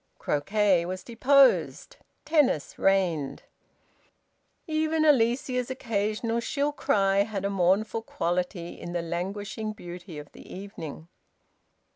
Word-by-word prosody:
Croquet 195 +4 +2
was 185 +1 -5
deposed; 265 +3 +3 0.3
tennis 290 - +1
reigned. 175 -8 +1 1.2
Even 315 0 +1
Alicia's 250 -2 +2
occasional 225 -2 -1
shrill 285 +4 -1
cry 195 -8 +1
had 200 -1 0
a 200 - 0
mournful 195 +4 +1
quality 175 -3 -3
in 175 - -6
the 175 -1 -1
languishing 200 +5 -4
beauty 175 -3 -9
of 145 -1 -9
the - - -14
evening. 165 -5 -8
200 Hz, 105 wpm, -27 LUFS, 175-235 Hz, 1.2 s, deposed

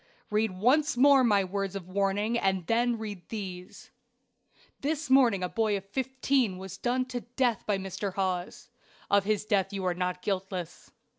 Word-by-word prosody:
Read 215 +1 +2
once 260 +6 +3
more 275 0 +6
my 205 -5 +4
words 195 +1 -3
of 185 -3 -6
warning, 200 +4 0
and 190 -6 0
then 235 +4 +1
read 210 -4 -6
these: 190 -3 -7 0.9
"This 300 0 -2
morning 240 -8 +5
a - - +1
boy 215 +1 0
of 195 - -9
fifteen 260 -1 0
was 190 0 -8
done 255 +1 0
to 250 -1 -4
death 240 -2 -1
by 205 -2 +2
Mr. 195 0 -4
Hawes. 185 +4 -3 0.4
Of 200 -1 +4
his 215 0 0
death 200 -3 +1
you 195 -2 -4
are 180 - +1
not 180 0 -3
guiltless. 185 -3 -4
205 Hz, 165 wpm, -29 LUFS, 190-240 Hz, 0.9 s, more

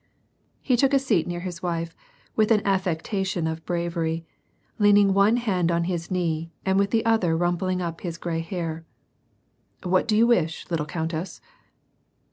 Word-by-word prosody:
He 255 - +2
took 275 +2 +3
a - - +7
seat 240 -11 +1
near 175 0 -4
his 180 -1 -6
wife, 170 -2 -3 0.4
with 215 -1 +3
an 215 -2 +3
affectation 190 -1 -1
of 160 0 -3
bravery, 170 -1 -2 0.5
leaning 205 -1 +5
one 200 +4 +4
hand 185 -8 0
on 170 0 +1
his 170 -1 -3
knee 165 -3 -1
and 190 0 +2
with 200 0 +2
the 225 +1 +1
other 195 -8 +2
rumpling 175 +1 0
up 165 -1 -5
his 170 -2 -4
gray 165 -1 -3
hair: 165 -1 -4 0.5
" - - -32
What 185 +3 +2
do 215 -2 +2
you 230 - +6
wish, 175 -9 +1
little 155 -3 -1
countess 165 +2 -4
175 Hz, 165 wpm, -25 LUFS, 165-200 Hz, 0.5 s, a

